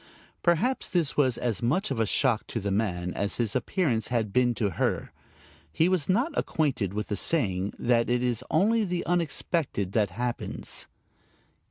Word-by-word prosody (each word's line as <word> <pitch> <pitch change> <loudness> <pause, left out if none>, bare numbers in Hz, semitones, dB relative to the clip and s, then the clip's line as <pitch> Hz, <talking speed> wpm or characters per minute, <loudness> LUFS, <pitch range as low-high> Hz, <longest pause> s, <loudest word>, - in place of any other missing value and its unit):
Perhaps 200 +10 +1
this 170 -6 +1
was 130 -5 +2
as 115 -6 -1
much 180 - +1
of 125 - -2
a 110 - +2
shock 120 -1 +1
to 115 - -3
the 100 -1 -2
man 90 -4 -1
as 100 +1 -1
his 115 -3 -1
appearance 130 - 0
had 110 -5 -1
been 125 -1 +3
to 105 -4 0
her. - - -1 0.6
He 165 - +2
was 185 -4 0
not 255 - +1
acquainted 135 - 0
with 105 +1 -4
the 105 - 0
saying 100 - 0
that 120 -1 +2
it 125 0 +1
is 125 -1 0
only 220 +7 +3
the 180 -3 -2
unexpected 165 - -1
that 105 -1 +2
happens. 120 +1 -3
125 Hz, 170 wpm, -27 LUFS, 110-170 Hz, 0.6 s, been